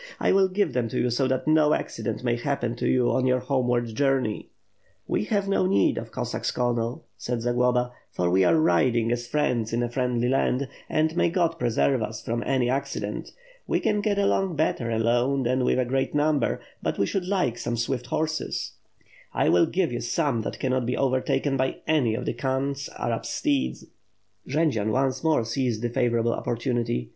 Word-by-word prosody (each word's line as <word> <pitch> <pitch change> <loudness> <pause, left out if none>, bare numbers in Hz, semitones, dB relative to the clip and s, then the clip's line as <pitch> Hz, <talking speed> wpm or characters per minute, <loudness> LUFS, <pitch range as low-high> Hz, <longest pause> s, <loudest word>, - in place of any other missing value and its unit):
1 - - +2
will 190 0 +5
give 185 -5 0
them 120 -2 0
to - - -3
you 125 - +1
so 130 +3 +1
that 130 +2 -1
no 155 -1 +4
accident 115 +2 -4
may 120 -1 +1
happen 120 -2 -2
to - - -2
you 125 -2 +3
on 130 0 +1
your 130 0 +3
homeward 125 -2 0
journey." 135 -4 0 0.6
"We - - -1
have 200 - 0
no 195 -2 +2
need 100 - +2
of - - -8
Cossacks, - - -3
Colonel," 120 +3 -1
said 120 -2 -3
Zagloba, 125 0 +1 0.2
"for 90 - -1
we 95 +2 +3
are 160 - +4
riding 120 -7 +2
as 120 0 -2
friends 120 -6 0
in 120 +1 +1
a 120 - -1
friendly 125 -1 0
land; 135 +1 +1 0.2
and 155 +1 +1
may 175 - +3
God 165 -1 0
preserve 125 +2 +1
us 110 0 -4
from 115 +1 -1
any 130 -3 +2
accident. 135 +2 -3 0.4
We - - +1
can 210 -1 +1
get 205 -1 0
along 195 -3 +1
better 135 -6 0
alone 120 +4 +1
than 130 +1 +1
with - - +2
a 130 - +2
great 135 +3 -1
number, 150 0 +1 0.2
but - - -2
we 100 - +2
should 180 - -2
like 180 - 0
some 120 0 -2
swift 125 +1 -2
horses." 155 +4 -2 0.6
"I - - +2
will 90 - +4
give 180 -4 0
you 120 - -3
some 120 0 0
that - - -5
cannot 130 -2 0
be 125 - -1
overtaken 135 +1 +1
by 130 0 0
any 135 -8 +2
of 125 - -4
the - - -1
Khan's 135 +1 -2
Arab - - -2
steeds." 65 -1 -1 0.6
Jendzian 135 -7 +1
once 130 +1 0
more 155 -8 +2
seized 115 -1 -1
the 120 - 0
favorable 120 -2 +1
opportunity. 115 - -2
125 Hz, 190 wpm, -25 LUFS, 120-145 Hz, 0.6 s, will